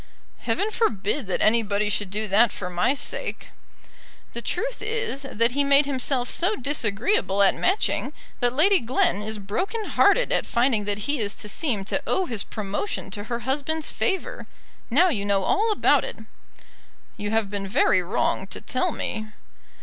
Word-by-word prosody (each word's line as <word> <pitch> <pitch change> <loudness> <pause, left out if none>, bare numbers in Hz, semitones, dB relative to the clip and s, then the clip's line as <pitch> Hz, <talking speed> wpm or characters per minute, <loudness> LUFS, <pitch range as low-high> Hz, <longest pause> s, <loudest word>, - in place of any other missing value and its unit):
"Heaven 420 +2 -1
forbid 225 - 0
that 185 - 0
anybody 210 -2 +2
should 205 -1 -1
do 215 +3 -3
that 210 +3 +4
for 180 -2 -6
my 180 +10 +1
sake." - - -3 0.8
"The - - -4
truth - - -3
is 435 - -2
that 235 -3 0
he 285 +3 +1
made 280 +1 +5
himself 260 -2 0
so 370 +10 +2
disagreeable 235 - 0
at 195 - +5
Matching 375 +4 0 0.3
that 245 -1 +2
Lady 375 +6 +5
Glen 230 -4 +1
is 215 +1 -3
broken 365 - -3
hearted - - +3
at - - 0
finding 235 -3 +2
that 205 0 -2
he 290 -1 -1
is 205 -2 -1
to - - -7
seem 210 -3 -2
to 285 - -1
owe 380 - +1
his 225 - -2
promotion 205 - -4
to 205 +1 -6
her 235 +1 -4
husband's 295 +5 -1
favour. 385 -3 -2 0.4
Now 330 +10 +4
you 215 -11 -1
know 200 -1 +1
all 425 +3 +2
about 420 - +3
it." - - -6 1.0
"You 205 -2 -4
have 220 -2 0
been 200 -1 -3
very 190 -1 +3
wrong 190 +1 -1
to - - -6
tell 325 +8 -1
me." 220 -6 -4
235 Hz, 170 wpm, -24 LUFS, 205-305 Hz, 1.0 s, made